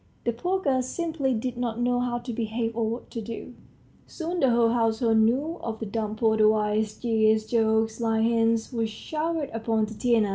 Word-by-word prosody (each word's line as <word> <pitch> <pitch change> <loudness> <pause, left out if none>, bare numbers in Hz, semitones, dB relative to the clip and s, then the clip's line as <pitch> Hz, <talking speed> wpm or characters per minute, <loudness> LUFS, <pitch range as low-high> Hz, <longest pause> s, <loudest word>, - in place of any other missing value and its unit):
The 235 - 0
poor 360 +11 -1
girl 270 -7 +1
simply 305 0 -2
did 240 +2 -3
not 235 -2 -2
know 245 0 +1
how 245 -1 -1
to 240 0 -6
behave 225 0 -2
or 225 -1 0
what 235 +2 -6
to 230 - -4
do. 230 +3 -7 0.5
Soon 345 +1 -4
the 270 - +4
whole 235 -1 +4
household 225 -1 +2
knew 265 +9 +1
of 225 -1 -4
the 225 - -5
dumb 215 0 -3
porter's 220 -1 +3
wiles; 215 0 +1
jeers, 220 -2 +2
jokes, 220 -1 +1
sly 225 -1 +1
hints, 230 +1 +1
were 230 -1 0
showered 310 +6 -3
upon 225 -1 0
Tatiana. 220 0 +1
230 Hz, 185 wpm, -26 LUFS, 220-245 Hz, 0.5 s, the